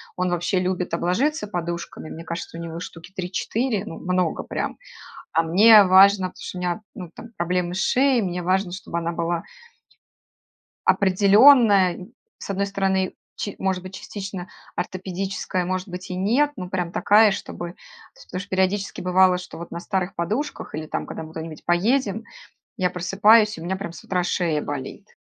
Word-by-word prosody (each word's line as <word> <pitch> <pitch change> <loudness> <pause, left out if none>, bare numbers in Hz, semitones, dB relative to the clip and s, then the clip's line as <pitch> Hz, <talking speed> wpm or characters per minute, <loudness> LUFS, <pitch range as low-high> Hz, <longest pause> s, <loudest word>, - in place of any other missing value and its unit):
он 180 0 0
вообще 175 +2 0
любит 180 -1 -2
обложиться 245 - 0
подушками. 170 -4 -5
Мне 165 +1 -8
кажется, 170 0 -6
у - - -6
него 165 0 -6
штуки 170 0 -10
3-4, 210 +4 -2
ну, 165 - -7
много 180 -2 -1
прям. - - -4 0.6
А 165 - +3
мне 205 +6 +7
важно, 190 +1 +6
потому 180 - -11
что 180 - -6
у - - -5
меня, 180 +2 -2
ну, 180 -4 -8
там, - - -10
проблемы 175 0 -1
с 185 - -3
шеей, 265 -1 +3
мне 180 -2 -3
важно, 185 +1 0
чтобы 180 -2 -5
она 170 0 -2
была 170 0 -2 1.4
определенная. 200 -1 +5 0.3
С - - -9
одной 200 0 0
стороны, 190 -1 0 0.2
ч 205 - -5
может 190 -1 -1
быть, 185 0 -8
частично 195 -3 -7 0.3
ортопедическая, 185 0 -3
может 185 +1 -2
быть, 180 +1 -8
и 180 - -4
нет, 240 +11 +2
но 180 -5 -6
прям 180 -2 -2
такая, 210 +3 +5
чтобы 175 -2 -5
то - - -20 0.4
есть, - - -16
потому 185 - -5
что - - -12
периодически 190 +2 0
бывало, 185 0 +4
что 180 - -9
вот 170 +1 -9
на 170 - -5
старых 190 0 -2
подушках 215 - -3
или 155 0 -4
там, - - -3
когда - - -7
мы 155 - -10
куда-нибудь 160 -1 -8
поедем, 215 +4 +1 0.5
я 185 -3 +1
просыпаюсь, 210 +4 +4
и - - -8
у - - -7
меня 190 - -1
прям 190 -3 -6
с - - -11
утра 180 -2 -1
шея 170 -4 0
болит. 145 +9 -6
185 Hz, 180 wpm, -23 LUFS, 175-200 Hz, 1.4 s, мне